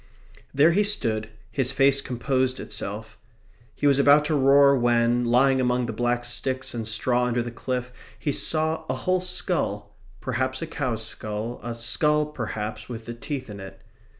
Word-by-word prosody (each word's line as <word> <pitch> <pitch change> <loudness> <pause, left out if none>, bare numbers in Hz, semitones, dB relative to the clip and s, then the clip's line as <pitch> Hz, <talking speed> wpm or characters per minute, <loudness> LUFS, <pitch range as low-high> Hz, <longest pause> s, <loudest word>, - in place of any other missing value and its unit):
There 150 +4 +4
he 200 +5 +3
stood. 110 - -1 0.2
His 130 +2 0
face 135 0 +3
composed 130 0 -1
itself. 105 +2 -5 0.6
He - - -3
was 140 -1 +4
about 145 +1 +5
to 155 - 0
roar 140 0 +5
when, 120 -1 +2
lying 130 +2 +3
among 125 0 +1
the 115 - -4
black 120 +2 -1
sticks 130 +2 -2
and 115 -2 -4
straw 120 +3 +1
under 120 -1 0
the 120 - -6
cliff, 125 +1 -4 0.2
he 145 - -2
saw 160 +2 0
a 130 - 0
whole 185 +8 0
skull 105 - -1 0.2
perhaps 130 +1 -2
a - - -3
cow's 125 -8 -3
skull, 110 +2 -5
a 120 -1 -5
skull, 150 +7 +2
perhaps, 110 -7 -5
with 115 -2 -7
the 120 - -6
teeth 130 +2 -5
in 105 -2 -9
it. 95 0 -10
125 Hz, 170 wpm, -25 LUFS, 115-140 Hz, 0.6 s, about